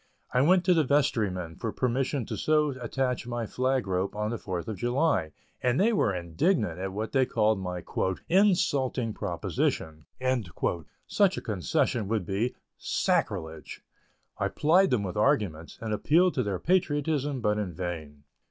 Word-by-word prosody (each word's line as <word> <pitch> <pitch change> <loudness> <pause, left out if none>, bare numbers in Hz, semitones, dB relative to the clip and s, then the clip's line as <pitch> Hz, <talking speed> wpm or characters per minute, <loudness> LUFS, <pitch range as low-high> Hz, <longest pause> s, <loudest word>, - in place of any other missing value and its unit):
I 125 - +4
went 180 +5 +4
to 185 - +5
the 160 -2 +3
vestrymen 105 - 0
for 115 - -2
permission 130 +1 -1
to 110 - -4
so 150 +7 +2
attach 125 -1 -2
my 120 -1 -3
flag 130 +2 0
rope 95 +1 -1
on 105 +1 -2
the 120 - -3
Fourth 90 -2 -4
of 110 -3 -4
July, 120 - +1 0.3
and 125 +2 +1
they 225 +4 +4
were 155 - +2
indignant 90 - 0
at 95 0 -3
what 110 +3 -4
they 135 -1 +3
called 110 -4 +2
my 90 -2 -4 0.4
"insulting 140 - +2
proposition"; 80 -4 -2 1.0
such 195 -2 +2
a - - -3
concession 105 +2 0
would 110 -3 -1
be 105 +7 -1 0.2
"sacrilege." 80 -2 -1 0.6
I - - +1
plied 180 +6 +3
them 120 -5 +1
with 95 0 -4
arguments, 105 - 0
and 110 -2 -3
appealed 170 - +3
to 130 - 0
their 100 -5 -1
patriotism, 145 - 0
but 105 -2 +1
in 100 -4 -3
vain. 80 -4 -6
115 Hz, 155 wpm, -28 LUFS, 95-140 Hz, 1.0 s, to